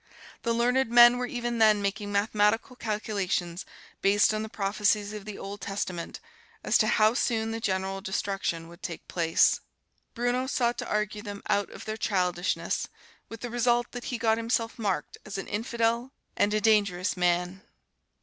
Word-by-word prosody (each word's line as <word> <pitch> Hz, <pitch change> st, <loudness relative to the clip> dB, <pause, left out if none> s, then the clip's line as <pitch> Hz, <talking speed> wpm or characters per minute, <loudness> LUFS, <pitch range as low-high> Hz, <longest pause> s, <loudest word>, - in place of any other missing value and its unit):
The 235 Hz, -, -1 dB
learned 245 Hz, +2 st, +2 dB
men 240 Hz, +1 st, +7 dB
were 250 Hz, -, -1 dB
even 240 Hz, -1 st, -3 dB
then 215 Hz, -2 st, +5 dB
making 205 Hz, +1 st, -2 dB
mathematical 210 Hz, +3 st, +1 dB
calculations, 200 Hz, -6 st, -2 dB, 0.3 s
based 205 Hz, +2 st, +4 dB
on 215 Hz, -, -1 dB
the 220 Hz, -, -5 dB
prophecies 205 Hz, 0 st, 0 dB
of 210 Hz, -2 st, -7 dB
the 210 Hz, -2 st, -7 dB
Old 200 Hz, +1 st, -7 dB
Testament, 185 Hz, -4 st, -4 dB, 0.4 s
as -, -, +1 dB
to -, -, +3 dB
how 215 Hz, +1 st, +4 dB
soon 225 Hz, -3 st, 0 dB
the 225 Hz, -, -3 dB
general 195 Hz, -2 st, -2 dB
destruction 190 Hz, -3 st, -2 dB
would 170 Hz, +2 st, -14 dB
take 170 Hz, -, -6 dB
place. 165 Hz, -2 st, +3 dB, 0.6 s
Bruno 245 Hz, +2 st, 0 dB
sought 240 Hz, -2 st, 0 dB
to -, -, -4 dB
argue 210 Hz, 0 st, -1 dB
them 205 Hz, -1 st, -8 dB
out 200 Hz, -1 st, +1 dB
of -, -, -10 dB
their 215 Hz, 0 st, -4 dB
childishness, 180 Hz, -4 st, -1 dB, 0.4 s
with 225 Hz, 0 st, -9 dB
the 245 Hz, -, -5 dB
result 240 Hz, 0 st, +1 dB
that 245 Hz, -, -7 dB
he 245 Hz, -, -2 dB
got 225 Hz, -1 st, +2 dB
himself 230 Hz, 0 st, -1 dB
marked 195 Hz, -9 st, -2 dB
as 205 Hz, -, -6 dB
an 195 Hz, -, -4 dB
infidel 230 Hz, +3 st, -1 dB, 0.2 s
and 205 Hz, -, +2 dB
a -, -, +3 dB
dangerous 200 Hz, -5 st, +2 dB
man. 180 Hz, +1 st, 0 dB
210 Hz, 170 wpm, -28 LUFS, 195-230 Hz, 0.6 s, men